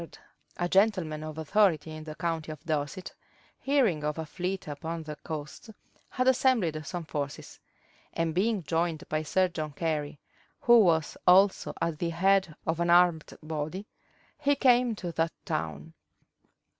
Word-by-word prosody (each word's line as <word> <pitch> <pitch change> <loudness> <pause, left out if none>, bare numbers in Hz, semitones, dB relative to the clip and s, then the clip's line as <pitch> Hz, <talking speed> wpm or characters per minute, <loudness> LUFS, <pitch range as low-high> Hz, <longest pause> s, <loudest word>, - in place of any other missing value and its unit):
Sir - - -5
John - - -21
Trenchard, 175 - -8
a - - 0
gentleman 185 -6 +2
of 155 0 -7
authority 160 -2 +2
in 155 0 -8
the 155 -1 -7
county 165 -2 -3
of 155 +2 -11
Dorset, 155 +3 -3 0.5
hearing 245 - +1
of 150 +1 -2
a 160 - -3
fleet 180 +4 -4
upon 160 +3 -5
the 150 -1 -7
coast, 150 +7 -7 0.4
had 255 0 -1
assembled 235 - +2
some 175 -2 -4
forces; 145 -3 -5 0.5
and 165 -1 -1
being 200 +2 +1
joined 165 0 -1
by 155 0 0
Sir 185 +4 +2
John 155 -4 -5
Cary, 150 -2 -2 0.4
who 240 -1 +7
was 165 -7 +2
also 190 +2 +5
at 165 -2 -2
the 170 - -1
head 190 0 +2
of 160 +1 -1
an 170 0 +1
armed 175 -2 +3
body, 155 +5 -4 0.5
he 285 0 +2
came 245 -3 +3
to 180 -4 -5
that 165 0 -1
town. 80 0 -4
165 Hz, 160 wpm, -28 LUFS, 155-190 Hz, 0.5 s, who